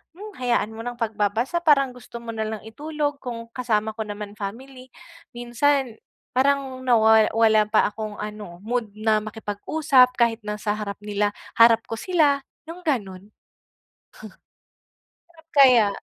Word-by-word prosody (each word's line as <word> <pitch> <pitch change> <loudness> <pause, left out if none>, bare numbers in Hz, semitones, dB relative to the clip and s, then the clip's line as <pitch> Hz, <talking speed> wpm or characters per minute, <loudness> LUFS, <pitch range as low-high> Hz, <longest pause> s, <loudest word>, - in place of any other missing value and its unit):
hmm, 415 +2 -10
hayaan 240 -3 0
mo 220 - -10
nang 245 0 -4
pagbabasa 225 - -1
parang 275 -5 +4
gusto 250 -1 -15
mo 230 - -5
na 220 -1 -3
lang 220 -1 -5
itulog, 290 +4 -3
kung 235 -3 -7
kasama 220 -4 0
ko 220 - -3
naman 205 0 -7
family. 255 +6 -8 0.5
Minsan 240 +1 0 0.4
parang 270 0 +1
nawa 220 -3 +5
wala 220 -1 +4
pa 215 -1 +3
akong 215 -1 -6
ano 210 -5 -8
mood 230 -1 -2
na 215 0 +2
makipag-usap 250 +5 +1
kahit 235 -1 +2
na 210 - -2
sa 210 - -1
harap 200 -1 -4
nila, 205 0 -1 0.3
harap 230 0 +6
ko 225 - -4
sila 305 -5 +2 0.3
yung 335 +2 -8
ganun. 200 -7 -3 2.0
Bakit 330 -1 -22
kaya? 240 -8 +6
230 Hz, 140 wpm, -23 LUFS, 215-265 Hz, 2.0 s, harap